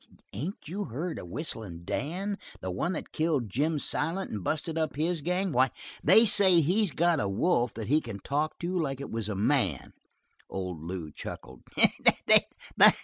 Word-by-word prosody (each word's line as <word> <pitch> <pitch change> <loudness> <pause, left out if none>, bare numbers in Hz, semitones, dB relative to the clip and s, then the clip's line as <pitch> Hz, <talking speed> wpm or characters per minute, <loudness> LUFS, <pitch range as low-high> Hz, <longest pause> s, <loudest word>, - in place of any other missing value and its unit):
"Ain't 150 - -6
you 200 +6 -4
heard 155 +9 -5
of - - -9
Whistlin' 95 - -6
Dan? 190 - -3 0.2
The 95 - -4
one 165 - -2
that 160 - -6
killed 150 - -1
Jim 150 +7 0
Silent 165 +6 -1
and 105 -3 -5
busted 160 - -2
up 160 -1 -1
his 160 +2 -1
gang. 180 +4 -1
Why, 130 -1 +3 0.3
they 220 +8 +7
say 195 -4 +6
he's 185 +7 +2
got 170 +1 +1
a 100 - -1
wolf 120 - +1
that 110 - -5
he 150 +4 +3
can 115 -7 -7
talk 145 +9 -2
to 180 +2 -3
like 135 -4 -2
it 140 - -7
was 110 -2 -3
a 105 - -3
man." 100 - 0 0.6
Old 90 -4 -5
Lew 85 -2 -6
chuckled. 65 -3 -9
145 Hz, 170 wpm, -28 LUFS, 105-175 Hz, 0.6 s, they